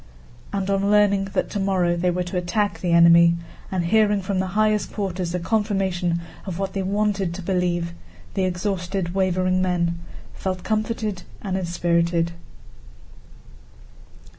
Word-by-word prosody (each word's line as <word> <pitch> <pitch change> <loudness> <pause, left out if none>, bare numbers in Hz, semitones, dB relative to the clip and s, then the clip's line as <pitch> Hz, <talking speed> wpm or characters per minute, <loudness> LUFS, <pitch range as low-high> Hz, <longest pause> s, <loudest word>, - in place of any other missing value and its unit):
And 195 -1 -2
on 195 0 +1
learning 205 -1 +4
that - - -1
tomorrow 190 -4 +1
they 175 +1 +1
were 180 +1 0
to 180 +1 -6
attack 180 0 0
the 175 0 -1
enemy, 170 0 +7 0.4
and 180 -3 0
hearing 210 +1 +3
from 190 0 -1
the 190 - 0
highest 215 -1 +2
quarters 185 -4 -3
a - - 0
confirmation 190 -4 0 0.3
of 180 -3 -4
what 195 0 -3
they 195 - -1
wanted 195 -2 0
to 190 - -7
believe, 175 -2 0 0.4
the 195 - 0
exhausted, 180 -1 -2
wavering 185 -1 +1
men 170 -2 0 0.3
felt 185 -2 -4
comforted 215 -3 -1 0.2
and 190 -2 -2
inspirited. 170 -1 +1
185 Hz, 140 wpm, -23 LUFS, 175-200 Hz, 0.4 s, enemy